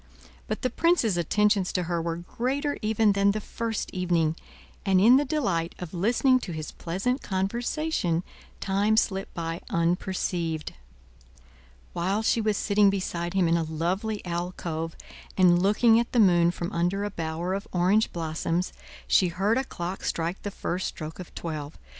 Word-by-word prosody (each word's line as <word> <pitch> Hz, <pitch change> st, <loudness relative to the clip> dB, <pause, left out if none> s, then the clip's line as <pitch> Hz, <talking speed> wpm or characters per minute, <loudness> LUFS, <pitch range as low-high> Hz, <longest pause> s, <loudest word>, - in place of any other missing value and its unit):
But -, -, -4 dB
the 255 Hz, -, +1 dB
prince's 335 Hz, -, +2 dB
attentions 200 Hz, +3 st, +2 dB
to 180 Hz, -, 0 dB
her 170 Hz, -1 st, -1 dB
were 165 Hz, 0 st, -2 dB
greater 260 Hz, -, -2 dB
even 215 Hz, -1 st, +3 dB
than 200 Hz, 0 st, +3 dB
the 215 Hz, -, -2 dB
first 225 Hz, +1 st, -4 dB
evening, 170 Hz, -4 st, +1 dB, 0.5 s
and 190 Hz, -2 st, +3 dB
in 235 Hz, +7 st, +7 dB
the 290 Hz, -, +2 dB
delight 195 Hz, -, -1 dB
of 180 Hz, -1 st, -7 dB
listening 240 Hz, +8 st, +3 dB
to 180 Hz, -, -6 dB
his 155 Hz, -1 st, -5 dB
pleasant 200 Hz, +11 st, -2 dB
conversation, 195 Hz, -, -1 dB, 0.4 s
time 205 Hz, +2 st, +1 dB
slipped 195 Hz, -3 st, 0 dB
by 165 Hz, 0 st, -3 dB
unperceived. 170 Hz, -2 st, -1 dB, 1.2 s
While 195 Hz, +5 st, 0 dB
she 225 Hz, -, +2 dB
was 215 Hz, -1 st, +1 dB
sitting 205 Hz, -1 st, +4 dB
beside 175 Hz, -2 st, -2 dB
him 185 Hz, -3 st, +3 dB
in 165 Hz, +1 st, +3 dB
a -, -, 0 dB
lovely 180 Hz, +7 st, -2 dB
alcove, 170 Hz, -2 st, -3 dB, 0.4 s
and 175 Hz, -2 st, +5 dB
looking 225 Hz, +4 st, +5 dB
at 235 Hz, -, -2 dB
the 245 Hz, -, +3 dB
moon 175 Hz, -5 st, +5 dB
from 175 Hz, 0 st, -4 dB
under 175 Hz, +4 st, 0 dB
a 205 Hz, -, -3 dB
bower 165 Hz, +1 st, -3 dB
of 200 Hz, +1 st, -4 dB
orange 185 Hz, +5 st, +2 dB
blossoms, 165 Hz, +2 st, -2 dB, 0.3 s
she 185 Hz, -, +4 dB
heard 195 Hz, +8 st, +1 dB
a -, -, 0 dB
clock 180 Hz, -6 st, -5 dB
strike 170 Hz, +3 st, -2 dB
the 205 Hz, -, -4 dB
first 185 Hz, -2 st, -3 dB
stroke 155 Hz, +2 st, -7 dB
of 180 Hz, -, -8 dB
twelve. 155 Hz, -3 st, -5 dB
185 Hz, 160 wpm, -27 LUFS, 170-215 Hz, 1.2 s, in